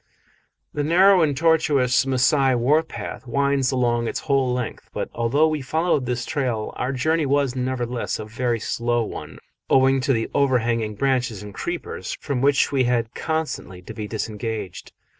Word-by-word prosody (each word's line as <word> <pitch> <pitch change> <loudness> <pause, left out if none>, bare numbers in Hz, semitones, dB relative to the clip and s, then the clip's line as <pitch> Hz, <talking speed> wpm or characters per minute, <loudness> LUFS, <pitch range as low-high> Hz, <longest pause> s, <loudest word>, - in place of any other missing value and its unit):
A 150 - -1
narrow 180 +5 +5
and 145 -4 +1
tortuous 140 -5 +3
Masai 130 0 +3
warpath 145 +2 -1
winds 140 +1 +1
along 120 -2 +1
its - - -3
whole 135 -3 +1
length, 125 -2 -4
but - - -4
although 120 +7 +2
we 155 -2 -2
followed 155 -1 0
this 120 -1 -2
trail 120 -6 -2
our 125 - -2
journey 155 +3 0
was 140 -2 +1
nevertheless 125 -2 -2
a - - -6
very 115 +2 -1
slow 120 +2 -1
one, - - -7 0.3
owing 135 0 +4
to 135 - +1
the 115 -3 0
overhanging 115 -5 +1
branches 125 -4 0
and 105 -1 -9
creepers, 175 - -5
from 140 -4 -2
which 140 0 +3
we 135 -3 +2
had 120 -2 0
constantly 160 - -3
to - - -9
be 105 -1 -5
disengaged. 110 -3 -5
130 Hz, 160 wpm, -23 LUFS, 120-140 Hz, 0.3 s, narrow